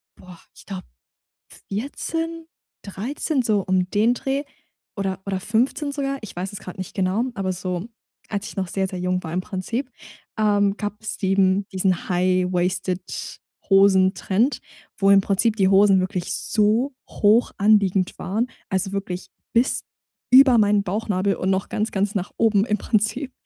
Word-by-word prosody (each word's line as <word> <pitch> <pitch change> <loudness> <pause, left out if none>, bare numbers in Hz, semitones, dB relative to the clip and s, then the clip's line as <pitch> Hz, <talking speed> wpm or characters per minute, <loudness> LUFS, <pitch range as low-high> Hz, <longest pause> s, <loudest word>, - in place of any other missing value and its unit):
boah, 180 -2 -14 0.2
ich - - -15
glaube, 95 -1 -6 0.9
14, 325 +9 -4 0.4
13 255 - -2
so 215 -3 +2
um 185 -1 0
den 220 +4 +3
Dreh, 270 +2 -2 0.5
oder 190 -1 -2
oder 190 -1 -1
15 245 +8 0
sogar? 275 -1 -2
Ich 215 - -9
weiß 185 +3 -4
es 205 - -6
grad 180 +1 -9
nicht 185 - -6
genau, 190 +5 +1
aber 190 -2 -2
so 180 +3 -4 0.4
als 205 -1 -3
ich - - -11
noch 190 -2 -2
sehr, 190 +1 -1
sehr 185 - -6
jung 180 0 -1
war 160 - -5
im 185 - +1
Prinzip, 225 +7 -4 0.5
ähm, 205 -1 +2
gab 210 0 -4
es 215 - -5
eben 195 0 +2
diesen 185 -1 0
high-waisted 180 0 -1 0.3
Hosen-Trend, 195 +5 +3 0.4
wo 195 0 +4
im 200 0 +7
Prinzip 210 +3 +1
die 190 -2 +3
Hosen 195 0 +5
wirklich 185 -1 -3
so 225 +6 +1
hoch 220 +3 +3
anliegend 200 -3 +3
waren, 220 +6 -1 0.2
also 190 0 0
wirklich 190 -2 -4 0.3
bis 240 +3 +2 0.5
über 265 -2 +8
meinen 205 -1 +3
Bauchnabel 200 0 -1
und 190 - -1
noch 190 0 0
ganz, 215 +2 -2
ganz 200 +2 0
nach 195 -1 -3
oben 215 -3 +3
im 210 - 0
Prinzip. 225 +7 -1
200 Hz, 155 wpm, -23 LUFS, 185-220 Hz, 0.9 s, über